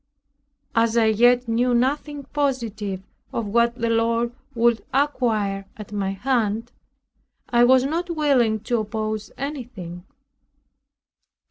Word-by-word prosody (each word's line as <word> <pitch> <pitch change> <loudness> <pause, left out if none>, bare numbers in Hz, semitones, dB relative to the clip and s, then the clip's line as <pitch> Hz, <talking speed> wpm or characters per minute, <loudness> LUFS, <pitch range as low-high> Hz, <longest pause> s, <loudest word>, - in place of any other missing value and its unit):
As 230 0 +2
I 230 - +5
yet 240 +3 +4
knew 240 +2 +2
nothing 285 +3 0
positive 230 -9 -2 0.3
of 230 - -2
what 235 +3 +2
the 230 -2 -1
Lord 230 +1 +1 0.2
would 235 -1 +2
acquire 220 -8 0
at 210 -1 -9
my 200 -2 -1
hand, 230 +1 -1 0.8
I 240 0 +5
was 260 +1 +5
not 335 +6 -2
willing 270 -9 +2
to 235 +1 0
oppose 215 0 -3
anything. 230 - -6
235 Hz, 115 wpm, -23 LUFS, 215-255 Hz, 0.8 s, I